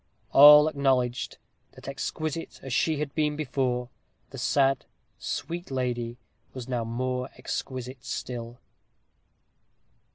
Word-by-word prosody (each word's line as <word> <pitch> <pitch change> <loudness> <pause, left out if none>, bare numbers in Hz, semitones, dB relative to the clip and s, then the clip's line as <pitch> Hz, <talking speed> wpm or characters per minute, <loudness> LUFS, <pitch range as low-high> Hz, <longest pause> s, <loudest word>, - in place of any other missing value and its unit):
All 150 +2 +10
acknowledged, 135 -4 0 0.4
that - - -13
exquisite 155 +3 -4
as 135 -2 -5
she 155 +4 +2
had 145 -1 -3
been 150 -1 0
before, 125 -4 -1 0.4
the - - -8
sad, 135 -2 +2 0.3
sweet 175 +1 -4
lady 120 -2 -2 0.4
was 125 -2 -6
now 125 -3 -1
more 125 +2 -2
exquisite 130 -1 -5
still. 120 -1 -5
130 Hz, 105 wpm, -27 LUFS, 125-145 Hz, 0.4 s, All